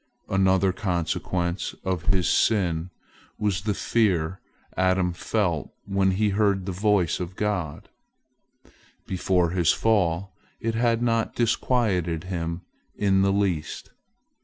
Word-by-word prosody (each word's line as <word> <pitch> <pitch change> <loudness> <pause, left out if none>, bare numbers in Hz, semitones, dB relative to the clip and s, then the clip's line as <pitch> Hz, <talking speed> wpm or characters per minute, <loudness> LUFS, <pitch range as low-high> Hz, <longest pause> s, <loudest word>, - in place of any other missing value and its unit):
Another 95 -1 +3
consequence 90 -1 -2
of 90 -3 -2
his 95 -4 +2
sin 90 -6 +2 0.5
was 100 -4 0
the 105 0 -1
fear 95 -7 +1 0.4
Adam 95 -1 +2
felt 90 -5 -1
when 100 -1 +2
he 105 +3 +1
heard 100 -2 +1
the 95 - -3
voice 100 -2 +1
of 90 0 -5
God: 90 -8 -2 1.2
before 90 -2 +1
his 85 -3 +3
fall 95 -4 +1 0.3
it 115 0 -1
had 115 0 +1
not 115 -1 0
disquieted 105 -8 +1
him 85 -2 -4 0.3
in 95 -2 +2
the 100 0 +3
least. 95 -6 -1
95 Hz, 115 wpm, -25 LUFS, 90-105 Hz, 1.2 s, Another